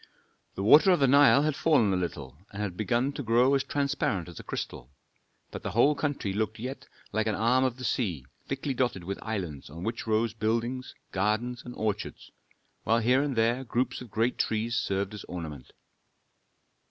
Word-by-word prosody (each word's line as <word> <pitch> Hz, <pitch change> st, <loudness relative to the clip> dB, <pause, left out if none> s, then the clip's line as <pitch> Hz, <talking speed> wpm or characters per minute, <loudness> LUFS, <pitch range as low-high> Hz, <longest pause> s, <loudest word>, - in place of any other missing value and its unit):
The 95 Hz, -, -3 dB
water 150 Hz, -, +7 dB
of 180 Hz, -3 st, +5 dB
the 135 Hz, -, +4 dB
Nile 140 Hz, +1 st, +6 dB
had 155 Hz, -2 st, 0 dB
fallen 130 Hz, -13 st, +3 dB
a -, -, +2 dB
little, 70 Hz, -7 st, -4 dB, 0.2 s
and 100 Hz, -, -8 dB
had 100 Hz, -4 st, -3 dB
begun 120 Hz, +7 st, 0 dB
to 145 Hz, -, -5 dB
grow 120 Hz, +2 st, +3 dB
as 135 Hz, -1 st, +2 dB
transparent 140 Hz, -, -1 dB
as 85 Hz, -, -10 dB
a -, -, -9 dB
crystal. 60 Hz, -, -6 dB, 0.6 s
But -, -, -6 dB
the -, -, -3 dB
whole 120 Hz, +7 st, +5 dB
country 145 Hz, -9 st, -2 dB
looked 110 Hz, +1 st, -1 dB
yet 130 Hz, +3 st, -6 dB, 0.2 s
like 110 Hz, +1 st, 0 dB
an 110 Hz, -, +1 dB
arm 125 Hz, +4 st, +3 dB
of 130 Hz, -2 st, 0 dB
the 130 Hz, -, -8 dB
sea 90 Hz, -, -1 dB, 0.2 s
thickly 135 Hz, +1 st, -2 dB
dotted 120 Hz, -8 st, -1 dB
with 100 Hz, +3 st, -4 dB
islands 90 Hz, -12 st, -4 dB
on 80 Hz, +4 st, -8 dB
which 115 Hz, +2 st, -4 dB
rose 110 Hz, 0 st, +1 dB
buildings, 115 Hz, +3 st, -2 dB, 0.2 s
gardens, 110 Hz, +5 st, -1 dB
and 125 Hz, -, -9 dB
orchards, 105 Hz, -1 st, -3 dB, 0.5 s
while 115 Hz, +2 st, +2 dB
here 125 Hz, +4 st, +3 dB
and 140 Hz, -2 st, -1 dB
there 115 Hz, +3 st, +2 dB
groups 125 Hz, +1 st, -1 dB
of 125 Hz, -, -9 dB
great 115 Hz, +4 st, 0 dB
trees 115 Hz, +1 st, 0 dB
served 100 Hz, -2 st, -1 dB
as 105 Hz, -, -7 dB
ornament. 80 Hz, -7 st, -7 dB
115 Hz, 190 wpm, -28 LUFS, 100-130 Hz, 0.6 s, water